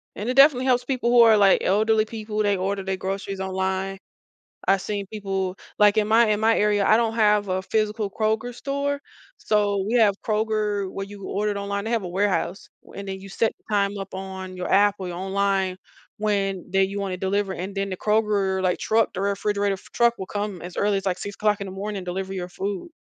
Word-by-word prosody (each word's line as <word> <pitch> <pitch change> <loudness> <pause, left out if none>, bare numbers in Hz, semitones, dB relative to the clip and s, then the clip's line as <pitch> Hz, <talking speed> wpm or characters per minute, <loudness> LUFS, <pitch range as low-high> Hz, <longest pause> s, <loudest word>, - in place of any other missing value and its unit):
and 210 - -5
it - - +1
definitely 270 -2 +6
helps 250 -1 +3
people 250 -2 0
who 240 -1 +7
are 225 -2 +7
like 200 -2 +4
elderly 215 +2 +3
people, 215 -1 -4
they 205 -1 +2
order 195 +1 -2
their 190 0 -2
groceries 195 +1 -4
online. 190 0 -2 0.7
I've 195 0 +4
seen 205 -2 -3
people 195 -2 -3 0.2
like, 210 0 +5
in 215 -1 +2
my 230 +2 +5
in 210 0 +1
my 225 +1 +3
area, 205 -1 +2
I 215 - +6
don't 225 -1 0
have 210 -2 +3
a 185 0 -1
physical 215 0 -1
Kroger 220 +4 -1
store, 280 +2 -2 0.4
so, 205 -2 +1
we 230 - -1
have 220 -4 +5
Kroger 215 -2 0
where 195 +1 -5
you 200 -1 -10
order 210 +1 -1
it - - -5
online 200 0 -3
they 225 - -3
have 230 -3 +1
a 180 - -5
warehouse, 190 0 -1 0.3
and 200 0 -7
then 190 0 -5
you 195 - -10
set 225 +3 +1
the - - -40
time 200 0 +1
up 195 0 -7
on 190 -1 -6
your 180 - -3
app 205 +1 +4
or 185 -2 -5
your 175 - -5
online 195 0 0 0.4
when 195 -3 -1
they 195 0 +3
you 200 +1 -4
want 195 -1 -3
to - - -2
deliver, 195 +1 -1
and 190 +2 -5
then 195 0 -2
the 185 - -3
Kroger, 210 -2 +1
like 180 -1 +1
truck 225 +1 +1
the - - -3
refrigerator 200 0 0 0.2
truck 235 0 +3
will 190 - -5
come 205 -2 -4
as 180 0 -8
early 205 0 +2
as, 195 - -8
like 185 -2 +1
6:00 205 0 -1
in - - -5
the - - -6
morning 205 +2 -4
and 185 - -7
deliver 190 +2 -4
your 180 -1 -4
food. 195 - -4
200 Hz, 225 wpm, -24 LUFS, 190-215 Hz, 0.7 s, who